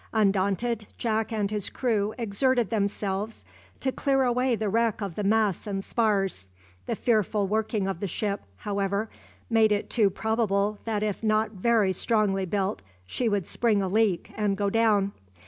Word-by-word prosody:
Undaunted, 205 +2 +1
Jack 220 -1 -1
and 210 -2 -1
his 210 -2 -2
crew 215 -5 0
exerted 240 0 +1
themselves 205 0 -2 0.3
to 265 - 0
clear 270 0 +1
away 250 0 +2
the 220 -1 -2
wreck 225 +1 +1
of 200 -4 -4
the 210 - -3
masts 210 -2 +1
and 195 -1 -2
spars. 195 - 0 0.4
The - - -1
fearful 215 -3 +1
working 215 0 0
of 195 -3 -3
the 200 - -2
ship, 200 +3 -2
however, 200 - -2 0.4
made 225 -2 +4
it 205 -1 -1
too 215 -4 +4
probable 210 -1 0
that 215 -2 -1
if 210 -2 -2
not 215 0 +1
very 210 -1 +2
strongly 195 -2 +1
built, 195 +2 -1 0.2
she 235 - -1
would 200 -4 0
spring 215 -2 +1
a - - 0
leak 205 -2 +1
and 205 -2 0
go 200 0 0
down. 210 -3 +3
210 Hz, 165 wpm, -27 LUFS, 200-225 Hz, 0.4 s, made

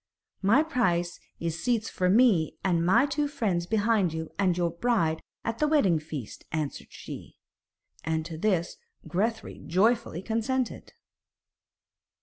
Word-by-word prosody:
'My 225 +10 +5
price 180 - 0 0.2
is 165 -1 -3
seats 235 -3 +1
for 180 -1 0
me 200 - +4
and 175 -3 +2
my 225 +10 +5
two 290 +1 0
friends 200 -12 -1
behind 210 -5 +2
you 160 0 -5
and 185 -3 +2
your 170 -1 +1
bride 170 -6 +1 0.2
at 230 0 -2
the 300 - +3
wedding 205 - +3
feast,' 150 -7 -7
answered 155 -2 -3
she. - - -9 0.7
And 160 0 -1
to 165 -1 -6
this 175 0 0 0.3
Grethari 220 +4 -2
joyfully 195 -1 +1
consented. 230 +3 -2
190 Hz, 130 wpm, -28 LUFS, 170-235 Hz, 0.7 s, My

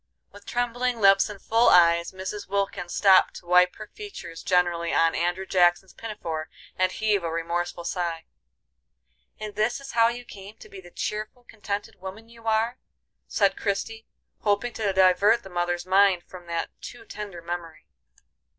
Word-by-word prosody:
With 205 0 -16
trembling 245 0 -1
lips 195 -1 +5
and 205 -1 -8
full 230 +4 +3
eyes 170 -1 +5
Mrs. 190 +2 -6
Wilkins 195 -3 -2
stopped 190 -2 +5
to - - -10
wipe 180 +1 +4
her 215 - -8
features 395 - -9
generally 175 -2 +1
on 165 0 +3
Andrew 175 +2 -1
Jackson's 180 0 +2
pinafore, 170 -8 -5 0.3
and 185 0 +1
heave 210 -3 0
a 165 - -2
remorseful 170 +1 -3
sigh. 170 -1 -3 1.1
"And 215 -1 -6
this 215 +5 0
is 275 -1 -9
how 230 0 +4
you 240 +1 -4
came 200 0 -11
to - - -14
be 190 - -10
the 175 - -14
cheerful, 215 +6 -5
contented 205 -3 -6
woman 200 +4 -9
you 230 -1 -13
are?" 225 +3 +1 0.5
said 200 -2 +2
Christie, 220 +2 -3 0.3
hoping 210 +3 0
to 210 -3 -1
divert 190 +4 +4
the 195 - -11
mother's 175 0 -1
mind 190 -1 +4
from 180 -2 -13
that 170 -1 -3
too 400 - -10
tender 205 - -8
memory. 170 -2 -6
195 Hz, 160 wpm, -25 LUFS, 175-215 Hz, 1.1 s, lips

